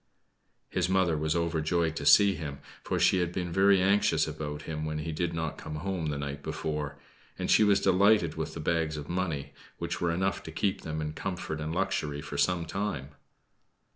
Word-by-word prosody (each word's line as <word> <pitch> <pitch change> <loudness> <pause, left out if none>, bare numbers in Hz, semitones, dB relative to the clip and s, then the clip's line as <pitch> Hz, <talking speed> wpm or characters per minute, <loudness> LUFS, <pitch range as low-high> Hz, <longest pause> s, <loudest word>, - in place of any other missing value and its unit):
His 90 -1 0
mother 95 -3 +3
was 75 +1 0
overjoyed 85 -1 0
to - - -2
see 100 -1 +7
him, 75 -5 -5 0.3
for - - -1
she 95 - +4
had 90 -1 0
been 90 -1 -3
very 95 +2 +5
anxious 100 +2 +3
about 75 -1 -5
him 75 -1 -4
when 75 0 -2
he 75 +2 -3
did 85 +2 -1
not 80 -2 -3
come 75 - -6
home 85 0 -2
the 75 -1 -2
night 70 0 -4
before; 75 -1 -3 0.4
and - - -1
she - - +6
was 100 -1 +4
delighted 95 -3 +4
with 80 -1 -4
the - - -5
bags 80 -1 0
of 75 -1 -6
money, 80 -6 -2 0.2
which 85 0 -4
were 85 - +2
enough 95 +3 0
to 80 - -8
keep 95 +4 -1
them 80 -1 -4
in 75 0 -3
comfort 80 -3 -4
and 80 +1 -3
luxury 85 -7 -1
for 75 - -7
some 90 -2 +2
time. 80 -7 -3
80 Hz, 200 wpm, -29 LUFS, 75-95 Hz, 0.4 s, see